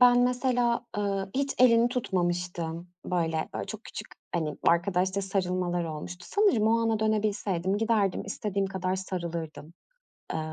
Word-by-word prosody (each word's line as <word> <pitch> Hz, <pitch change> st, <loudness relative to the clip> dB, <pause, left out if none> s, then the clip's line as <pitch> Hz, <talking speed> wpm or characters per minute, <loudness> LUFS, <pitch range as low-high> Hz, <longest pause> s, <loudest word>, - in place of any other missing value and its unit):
ben 245 Hz, 0 st, +7 dB
mesela, 245 Hz, -1 st, +2 dB
ııı, 195 Hz, -1 st, -1 dB
hiç 275 Hz, 0 st, 0 dB
elini 235 Hz, -1 st, +6 dB
tutmamıştım. 175 Hz, -6 st, -2 dB, 0.2 s
Böyle 175 Hz, -2 st, +1 dB
böyle, 160 Hz, -1 st, -1 dB
ooo, 100 Hz, -, -2 dB
çok -, -, -7 dB
küçük -, -, -7 dB, 0.3 s
hani 155 Hz, -4 st, -1 dB
arkadaşça 185 Hz, +2 st, +2 dB
sarılmalar 180 Hz, -2 st, 0 dB
olmuştu. 165 Hz, +3 st, -6 dB
Sanırım 390 Hz, -, +3 dB
o 230 Hz, +1 st, +4 dB
ana 225 Hz, -1 st, +1 dB
dönebilseydim 205 Hz, -3 st, 0 dB
giderdim, 215 Hz, -4 st, +1 dB
istediğim 200 Hz, -1 st, -2 dB
kadar 190 Hz, -1 st, -1 dB
sarılırdım. 170 Hz, -4 st, -5 dB, 0.6 s
Eee, -, -, -1 dB
195 Hz, 135 wpm, -28 LUFS, 175-225 Hz, 0.6 s, ben